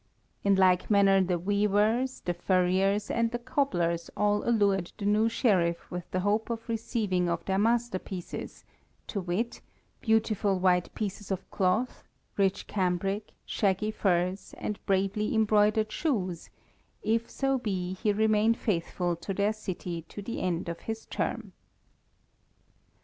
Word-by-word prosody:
In 200 -1 +4
like 185 -1 +3
manner 195 -2 +5
the 180 -1 +1
weavers, 210 +7 +1
the 175 - -1
furriers, 185 +3 +1
and 230 0 +1
the 240 - -2
cobblers 175 - 0
all 205 0 +2
allured 200 -6 +2
the 205 - -5
new 215 +2 +3
Sheriff 180 -8 +1
with 180 -1 -5
the 185 - -1
hope 210 +4 +1
of 230 -1 -4
receiving 215 -6 -1
of 170 0 -2
their 190 0 +1
masterpieces, 215 -5 -2 0.4
to 200 - -3
wit, 185 +7 -2 0.4
beautiful 215 -3 +2
white 180 -1 +2
pieces 205 -1 -4
of 190 -1 -3
cloth, 195 +7 0 0.3
rich 195 -1 +1
cambric, 195 +2 -1
shaggy 205 +1 0
furs, 185 -2 0
and 210 - -4
bravely 195 +3 +1
embroidered 215 0 +3
shoes, 190 - -2 0.5
if 225 +2 0
so 270 -1 0
be 185 -5 -2
he 210 +3 0
remain 215 +1 +3
faithful 175 -4 -1
to 190 +3 -5
their 205 +2 +2
city 180 -5 -5
to 205 - -8
the 230 - -4
end 180 -2 -1
of 170 0 -4
his 225 0 -5
term. - - -3
200 Hz, 140 wpm, -29 LUFS, 185-220 Hz, 0.5 s, manner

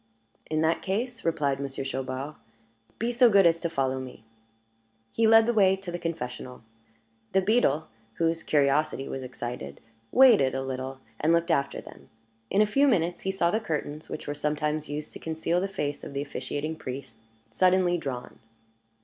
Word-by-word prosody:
"In 155 0 0
that 160 +1 +2
case," 230 +5 -3
replied 145 -5 0
Monsieur 135 -1 -4
Chaubard, 135 +2 -4 0.6
"be 235 +2 -1
so 240 0 +5
good 200 -3 +5
as 165 0 +4
to 170 - -2
follow 135 -4 0
me." 130 -4 -9 0.9
He 225 -1 +2
led 225 0 +7
the 240 - +1
way 195 -3 +5
to 190 -2 -7
the 175 - -4
confessional. 125 -7 -5 0.7
The 190 - +4
beadle, 185 - +2 0.3
whose 165 0 0
curiosity 145 -1 +1
was 135 - -5
excited, 120 - -6 0.3
waited 235 - +6
a 135 - -2
little, 130 0 -5 0.2
and 155 - +2
looked 170 +1 +2
after 140 -3 0
them. - - -14 0.4
In 205 - +4
a - - +3
few 275 +7 +3
minutes 175 -8 +1
he 190 - -2
saw 175 -3 +1
the 220 - +1
curtains, 155 -6 -4
which - - -6
were 145 - -3
sometimes 150 0 -2
used 150 +1 -5
to - - -9
conceal 165 +2 -1
the 195 - 0
face 145 -7 -3
of - - -7
the 140 - -2
officiating 150 +2 -4
priest, 130 -4 -7 0.3
suddenly 185 -1 +3
drawn. 130 -5 -6
155 Hz, 175 wpm, -27 LUFS, 135-190 Hz, 0.9 s, led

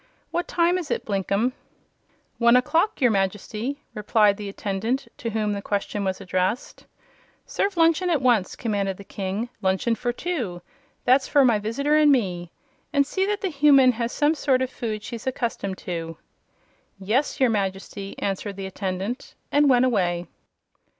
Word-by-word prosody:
What 345 - -1
time 350 +1 +2
is 335 - -6
it, - - -2
Blinkem?" 200 +4 0 0.9
"One 235 0 +5
o'clock, 325 +11 +2
your 245 -3 +5
Majesty," 210 +7 -2
replied 210 -1 +3
the 205 -1 -6
attendant 205 +6 -2
to 230 - -4
whom 215 -1 -1
the 200 - -4
question 205 0 -2
was 190 -1 -2
addressed. 185 +5 -2 0.6
"Serve 395 -2 -1
luncheon 330 +2 +3
at 325 -4 +2
once!" 240 -7 +2
commanded 200 -5 -2
the 200 - -10
King. 195 +4 -4
"Luncheon 190 +4 +1
for 240 +1 -1
two 240 - -4 0.4
that's 260 +2 +4
for 285 -2 +4
my 230 -4 +4
visitor 280 +8 0
and 300 -1 +6
me 180 -9 0 0.4
and 280 -2 +3
see 380 +7 -1
that 415 0 -1
the 385 - -1
human 275 -3 +6
has 235 0 -3
some 295 +1 +2
sort 265 -4 +1
of 260 - -4
food 215 -4 -4
she's 235 0 -7
accustomed 230 -7 -2
to." 165 -3 -5 0.8
"Yes, 225 +11 0
your 260 -3 +4
Majesty," 195 -1 -3
answered 200 +1 -3
the 195 0 -6
attendant, 190 +4 -4 0.2
and 290 0 +4
went 250 -1 +5
away. 180 -8 +1
230 Hz, 160 wpm, -24 LUFS, 195-270 Hz, 0.9 s, and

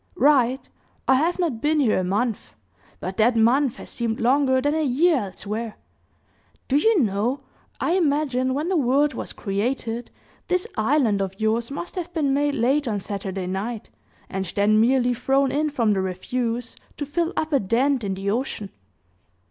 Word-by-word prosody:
"Right! 265 -4 +3 0.4
I - - +6
have 320 +7 +2
not 315 -11 -1
been 305 +1 +2
here 240 -9 +3
a - - -1
month; 210 +5 -2 0.4
but 185 +1 -5
that 230 +2 +4
month 240 +3 +3
has - - -10
seemed 230 -1 -2
longer 260 +2 +3
than 290 +3 +1
a 315 - 0
year 305 +5 +3
elsewhere. 215 +3 -5 0.9
Do 275 - +3
you 435 +6 +4
know, 225 +5 0 0.4
I - - 0
imagine 285 -7 +1
when 300 +4 -1
the 380 - +1
world 285 0 +2
was - - -5
created, 230 +3 -3 0.4
this 365 0 0
island 220 -3 +2
of 195 0 -4
yours 225 +2 0
must 285 +5 -6
have 355 -1 -4
been 285 -4 +1
made 290 +1 +1
late 270 +4 +1
on 210 -3 -1
Saturday 195 -1 -4
night, 205 +5 -4 0.4
and 190 0 -3
then 215 +1 +4
merely 250 +1 +3
thrown 270 +3 +1
in 305 +2 +1
from 235 -7 +1
the 190 - 0
refuse 230 +6 -3 0.2
to 290 - -3
fill 335 +4 -1
up 310 0 -1
a 280 - +5
dent 245 +5 +1
in 195 -1 -2
the 195 +1 -2
ocean." 220 -4 -3
250 Hz, 170 wpm, -23 LUFS, 215-290 Hz, 0.9 s, I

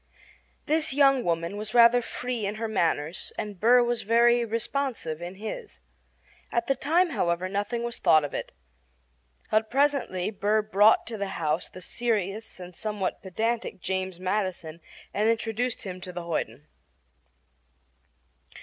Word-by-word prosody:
This 310 -2 +1
young 275 -3 +5
woman 170 +3 -1
was 215 +2 -5
rather 235 +1 +7
free 240 -2 -3
in 205 - -3
her 225 +1 -3
manners, 165 -6 -1
and 205 -3 -5
Burr 245 +4 +6
was 240 -1 -1
very 235 +2 +4
responsive 230 - -2
in 175 +2 -6
his. 220 - -7 0.7
At 235 0 0
the 275 - +2
time, 325 +7 +2
however, 170 - 0
nothing 205 +5 -2
was 235 0 -3
thought 155 -1 +5
of 145 - -7
it; - - -4 1.0
but 215 0 +2
presently 270 -9 +1
Burr 210 +1 +1
brought 215 +1 +4
to 225 -2 -6
the 200 - -1
house 160 +1 -1
the 185 - -11
serious 215 0 -2
and 180 -1 -10
somewhat 210 -2 -3
pedantic 220 +2 -2
James 185 0 -3
Madison 185 -4 -2 0.3
and 215 +2 +2
introduced 230 +1 -1
him 185 -2 -6
to 180 - -7
the 175 -1 -6
hoyden. 150 -5 -3
215 Hz, 145 wpm, -27 LUFS, 185-235 Hz, 1.0 s, rather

